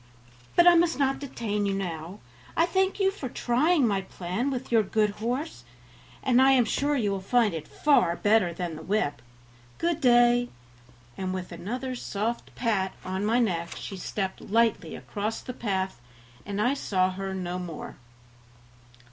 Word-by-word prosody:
But 345 Hz, -, +6 dB
I 350 Hz, -, +9 dB
must 340 Hz, -1 st, +3 dB
not 270 Hz, -1 st, +1 dB
detain 210 Hz, -7 st, -2 dB
you 195 Hz, -, 0 dB
now; 175 Hz, -1 st, -5 dB, 0.4 s
I 330 Hz, -, +5 dB
thank 380 Hz, +3 st, 0 dB
you 385 Hz, -1 st, +3 dB
for 295 Hz, -10 st, -6 dB
trying 275 Hz, +6 st, +2 dB
my 200 Hz, -4 st, +1 dB
plan 190 Hz, +7 st, -3 dB
with 260 Hz, -2 st, -4 dB
your 230 Hz, -2 st, +5 dB
good 210 Hz, +1 st, +1 dB
horse, 240 Hz, -, -3 dB, 0.6 s
and 255 Hz, -1 st, +4 dB
I 270 Hz, 0 st, +6 dB
am 250 Hz, -3 st, +4 dB
sure 285 Hz, +6 st, 0 dB
you 215 Hz, -7 st, +1 dB
will 195 Hz, -, -1 dB
find 225 Hz, +1 st, +2 dB
it 160 Hz, -2 st, -5 dB
far 185 Hz, -, +3 dB
better 205 Hz, -3 st, +3 dB
than 170 Hz, -1 st, -4 dB
the -, -, -8 dB
whip. 180 Hz, -, -1 dB, 0.6 s
Good 335 Hz, -1 st, -1 dB
day," 240 Hz, -1 st, +5 dB, 0.7 s
and 185 Hz, -1 st, -2 dB
with 185 Hz, -1 st, -6 dB
another 240 Hz, +10 st, -4 dB
soft 230 Hz, -1 st, -4 dB
pat 200 Hz, -6 st, 0 dB
on 190 Hz, +1 st, -2 dB
my 225 Hz, +3 st, +2 dB
neck 175 Hz, -8 st, 0 dB
she 200 Hz, -, -6 dB
stepped 190 Hz, +1 st, -4 dB
lightly 230 Hz, +2 st, +1 dB
across 210 Hz, +2 st, -4 dB
the 250 Hz, -, -7 dB
path, 190 Hz, -, -2 dB, 0.5 s
and 200 Hz, 0 st, -3 dB
I 245 Hz, +6 st, +3 dB
saw 185 Hz, -9 st, +1 dB
her 190 Hz, +1 st, -4 dB
no 180 Hz, -1 st, -3 dB
more. 175 Hz, -3 st, -7 dB
215 Hz, 165 wpm, -27 LUFS, 190-255 Hz, 0.7 s, I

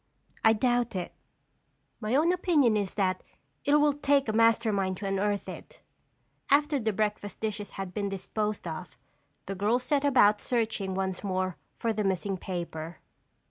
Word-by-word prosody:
"I 220 Hz, -, +7 dB
doubt 240 Hz, 0 st, +1 dB
it. 180 Hz, -2 st, -4 dB, 0.9 s
My 220 Hz, +2 st, -1 dB
own 325 Hz, +5 st, +4 dB
opinion 310 Hz, -, +3 dB
is 200 Hz, -3 st, -1 dB
that 185 Hz, -2 st, +1 dB, 0.4 s
it 285 Hz, -, +4 dB
will 295 Hz, -1 st, +4 dB
take 285 Hz, -1 st, +2 dB
a 215 Hz, -, 0 dB
master 230 Hz, 0 st, +4 dB
mind 190 Hz, -2 st, 0 dB
to 205 Hz, -, -6 dB
unearth 200 Hz, +1 st, 0 dB
it." -, -, -9 dB, 0.7 s
After 290 Hz, 0 st, +3 dB
the 220 Hz, -2 st, 0 dB
breakfast 210 Hz, -1 st, -2 dB
dishes 215 Hz, -1 st, -4 dB
had 190 Hz, -2 st, -6 dB
been 200 Hz, -1 st, -2 dB
disposed 210 Hz, +1 st, -3 dB
of, 165 Hz, +2 st, -7 dB, 0.5 s
the 195 Hz, -, -4 dB
girls 215 Hz, +6 st, +1 dB
set 285 Hz, +1 st, +1 dB
about 215 Hz, -7 st, +5 dB
searching 220 Hz, -5 st, -1 dB
once 190 Hz, 0 st, -2 dB
more 185 Hz, -2 st, -1 dB, 0.2 s
for 230 Hz, -1 st, 0 dB
the 215 Hz, 0 st, -1 dB
missing 195 Hz, 0 st, 0 dB
paper. 170 Hz, -3 st, -5 dB
210 Hz, 160 wpm, -28 LUFS, 195-245 Hz, 0.9 s, I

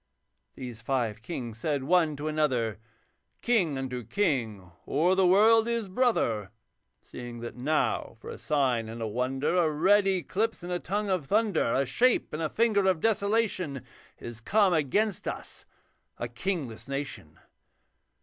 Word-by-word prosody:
These 120 Hz, -4 st, -8 dB
five 115 Hz, -4 st, -1 dB
kings 120 Hz, -6 st, -6 dB
said 145 Hz, -1 st, -1 dB
one 160 Hz, 0 st, +3 dB
to 145 Hz, +2 st, -5 dB
another, 130 Hz, -9 st, 0 dB, 0.6 s
'King 185 Hz, -, +2 dB
unto 125 Hz, -2 st, -4 dB
king 115 Hz, -, -1 dB, 0.2 s
o'er 165 Hz, +6 st, +2 dB
the 190 Hz, -1 st, +3 dB
world 220 Hz, +4 st, +5 dB
is 230 Hz, -4 st, -1 dB
brother, 185 Hz, -, +1 dB, 0.5 s
Seeing 120 Hz, -1 st, -8 dB
that 120 Hz, -, -6 dB
now, 145 Hz, +6 st, -1 dB
for -, -, -8 dB
a -, -, -9 dB
sign 130 Hz, -7 st, 0 dB
and 115 Hz, +1 st, -7 dB
a 115 Hz, -, -2 dB
wonder, 130 Hz, +8 st, -1 dB
A 170 Hz, -3 st, +3 dB
red 195 Hz, +7 st, +3 dB
eclipse 195 Hz, +3 st, -1 dB
and 175 Hz, -, -5 dB
a 175 Hz, -, -1 dB
tongue 205 Hz, +3 st, -2 dB
of 175 Hz, -7 st, -1 dB
thunder, 205 Hz, -, +1 dB
A 135 Hz, -, +2 dB
shape 240 Hz, -, +2 dB
and 155 Hz, -, -3 dB
a 155 Hz, -, -1 dB
finger 215 Hz, -2 st, +2 dB
of 185 Hz, -4 st, +2 dB
desolation, 200 Hz, -, 0 dB, 0.3 s
Is 120 Hz, -1 st, -9 dB
come 200 Hz, -, +3 dB
against 175 Hz, +7 st, 0 dB
us -, -, -7 dB, 0.5 s
a 120 Hz, -, -3 dB
kingless 125 Hz, -, -4 dB
nation. 135 Hz, -, -5 dB
155 Hz, 150 wpm, -28 LUFS, 120-195 Hz, 0.6 s, world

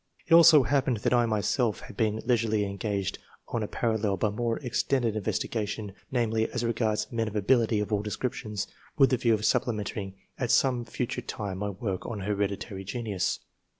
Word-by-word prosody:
It 170 Hz, 0 st, +8 dB
so 155 Hz, -4 st, +8 dB
happened 135 Hz, -3 st, +1 dB
that -, -, +2 dB
I 120 Hz, -1 st, +4 dB
myself 110 Hz, +2 st, 0 dB
had -, -, -11 dB
been 110 Hz, 0 st, 0 dB
leisurely 110 Hz, -4 st, +2 dB
engaged 100 Hz, -1 st, -2 dB, 0.3 s
on 115 Hz, -, -1 dB
a 105 Hz, -, -2 dB
parallel 110 Hz, -4 st, 0 dB
but 100 Hz, +2 st, 0 dB
more 115 Hz, +1 st, -1 dB
ex 120 Hz, -2 st, 0 dB
tended 120 Hz, -5 st, 0 dB
investigation 105 Hz, -1 st, -2 dB
— -, -, -38 dB
^namely, 115 Hz, -3 st, +1 dB
as 125 Hz, -, -3 dB
regards 110 Hz, -2 st, 0 dB
men 115 Hz, -2 st, -1 dB
of 105 Hz, -, -6 dB
ability 110 Hz, +1 st, +3 dB
of 105 Hz, +1 st, -2 dB
all 100 Hz, -, +2 dB
descriptions, 105 Hz, -1 st, -3 dB, 0.3 s
with 135 Hz, -2 st, +5 dB
the 130 Hz, -, +3 dB
view 115 Hz, -2 st, +3 dB
of 105 Hz, 0 st, -3 dB
supplementing 105 Hz, -4 st, -1 dB, 0.2 s
at 125 Hz, -2 st, -1 dB
some 125 Hz, -3 st, +3 dB
future 120 Hz, 0 st, -3 dB
time 100 Hz, -3 st, -5 dB
my 105 Hz, 0 st, -1 dB
work 95 Hz, -1 st, -4 dB
on 110 Hz, -4 st, -4 dB
Hereditary 100 Hz, 0 st, -2 dB
Genius. 105 Hz, -2 st, -2 dB
110 Hz, 185 wpm, -28 LUFS, 105-120 Hz, 0.3 s, It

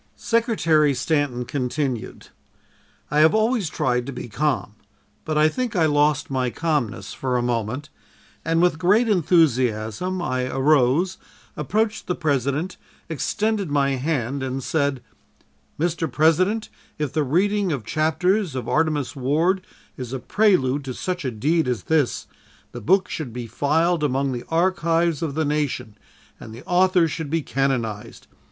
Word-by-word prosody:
Secretary 165 Hz, -, +2 dB
Stanton 145 Hz, -5 st, 0 dB
continued: 130 Hz, -1 st, -3 dB, 0.8 s
"I 150 Hz, -, +2 dB
have 160 Hz, +6 st, +5 dB
always 220 Hz, -4 st, +1 dB
tried 125 Hz, -3 st, -1 dB
to -, -, -3 dB
be 125 Hz, -, -7 dB
calm, 135 Hz, -2 st, -1 dB, 0.5 s
but 155 Hz, -1 st, -1 dB
I 155 Hz, +1 st, +5 dB
think 240 Hz, +6 st, -2 dB
I 165 Hz, -3 st, +3 dB
lost 145 Hz, -2 st, +2 dB
my 130 Hz, -2 st, 0 dB
calmness 150 Hz, -5 st, -2 dB
for 130 Hz, -2 st, -1 dB
a 120 Hz, -, 0 dB
moment, 120 Hz, +5 st, -2 dB, 0.5 s
and 165 Hz, +1 st, +2 dB
with 175 Hz, -3 st, +2 dB
great 205 Hz, +7 st, +3 dB
enthusiasm 160 Hz, -, +1 dB
I 130 Hz, -7 st, -1 dB
arose, 140 Hz, +6 st, +2 dB, 0.4 s
approached 215 Hz, +8 st, -1 dB
the 180 Hz, -, 0 dB
President, 145 Hz, +3 st, -1 dB, 0.3 s
extended 205 Hz, +5 st, -1 dB
my 140 Hz, -1 st, +2 dB
hand 135 Hz, -1 st, -1 dB
and 130 Hz, 0 st, -3 dB
said: 140 Hz, -4 st, -1 dB, 0.8 s
"'Mr. 165 Hz, -2 st, -1 dB
President, 185 Hz, -, +2 dB, 0.3 s
if 150 Hz, -4 st, -3 dB
the 155 Hz, -, +1 dB
reading 195 Hz, +6 st, +1 dB
of 135 Hz, -7 st, -3 dB
chapters 165 Hz, +2 st, +1 dB
of 125 Hz, -3 st, -4 dB
"Artemus 155 Hz, -3 st, 0 dB
Ward" 160 Hz, +8 st, +1 dB, 0.4 s
is 125 Hz, -1 st, -6 dB
a 135 Hz, -, -2 dB
prelude 145 Hz, -, +2 dB
to 130 Hz, -2 st, -5 dB
such 180 Hz, -2 st, -3 dB
a 130 Hz, -, -1 dB
deed 150 Hz, +7 st, 0 dB
as 120 Hz, -6 st, -2 dB
this, 155 Hz, -6 st, 0 dB, 0.5 s
the 120 Hz, -, -8 dB
book 190 Hz, -, +3 dB
should 150 Hz, -7 st, -5 dB
be 120 Hz, +1 st, -6 dB
filed 155 Hz, +8 st, +1 dB
among 135 Hz, -1 st, 0 dB
the 120 Hz, -2 st, -5 dB
archives 170 Hz, -1 st, +1 dB
of 155 Hz, -4 st, -3 dB
the 160 Hz, 0 st, 0 dB
nation, 145 Hz, -7 st, -2 dB, 0.4 s
and 110 Hz, -, -10 dB
the 120 Hz, -, -12 dB
author 180 Hz, -1 st, +3 dB
should 160 Hz, -1 st, -5 dB
be 160 Hz, 0 st, 0 dB
canonized. 120 Hz, -5 st, -2 dB
150 Hz, 145 wpm, -23 LUFS, 130-175 Hz, 0.8 s, have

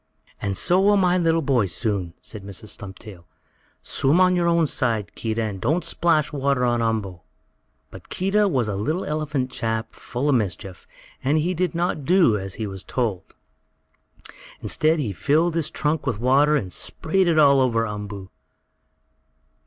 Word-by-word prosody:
"And 100 Hz, -2 st, -2 dB
so 180 Hz, +1 st, +2 dB
will 205 Hz, +1 st, +4 dB
my 180 Hz, -2 st, +3 dB
little 165 Hz, -1 st, +2 dB
boy, 125 Hz, -7 st, +2 dB
soon," 95 Hz, -1 st, -3 dB
said 105 Hz, -3 st, -10 dB
Mrs. 100 Hz, +2 st, -7 dB
Stumptail. 95 Hz, -2 st, -9 dB, 0.6 s
"Swim 145 Hz, +6 st, +1 dB
on 185 Hz, 0 st, +4 dB
your 175 Hz, -1 st, +1 dB
own 170 Hz, -1 st, +3 dB
side, 115 Hz, -7 st, -1 dB
Keedah, 115 Hz, 0 st, -2 dB
and 100 Hz, -4 st, -4 dB
don't 165 Hz, +2 st, 0 dB
splash 165 Hz, -2 st, +1 dB
water 140 Hz, -3 st, +1 dB
on 120 Hz, -1 st, +1 dB
Umboo." 110 Hz, -6 st, -2 dB, 0.7 s
But -, -, -13 dB
Keedah 200 Hz, +3 st, +1 dB
was 130 Hz, -, 0 dB
a 100 Hz, -, -2 dB
little 155 Hz, -, -2 dB
elephant 150 Hz, -4 st, -2 dB
chap 110 Hz, 0 st, -2 dB
full 125 Hz, +4 st, -4 dB
of 145 Hz, -, +3 dB
mischief, 95 Hz, -5 st, -3 dB, 0.4 s
and 140 Hz, +4 st, +2 dB
he 170 Hz, +4 st, 0 dB
did 180 Hz, -1 st, -1 dB
not 170 Hz, -3 st, -1 dB
do 170 Hz, -, +4 dB
as 95 Hz, -2 st, -4 dB
he 110 Hz, -, -4 dB
was 95 Hz, -2 st, -7 dB
told. 110 Hz, -8 st, -3 dB, 1.2 s
Instead 155 Hz, +2 st, +1 dB
he 120 Hz, -10 st, -2 dB
filled 155 Hz, -, +1 dB
his 160 Hz, -2 st, 0 dB
trunk 150 Hz, -2 st, -1 dB
with 120 Hz, -6 st, 0 dB
water 140 Hz, +5 st, +4 dB
and 95 Hz, -11 st, -2 dB
sprayed 185 Hz, +3 st, 0 dB
it 165 Hz, -2 st, +2 dB
all 140 Hz, -3 st, +6 dB
over 115 Hz, -3 st, +1 dB
Umboo. 105 Hz, -2 st, -7 dB
130 Hz, 165 wpm, -23 LUFS, 105-160 Hz, 1.2 s, all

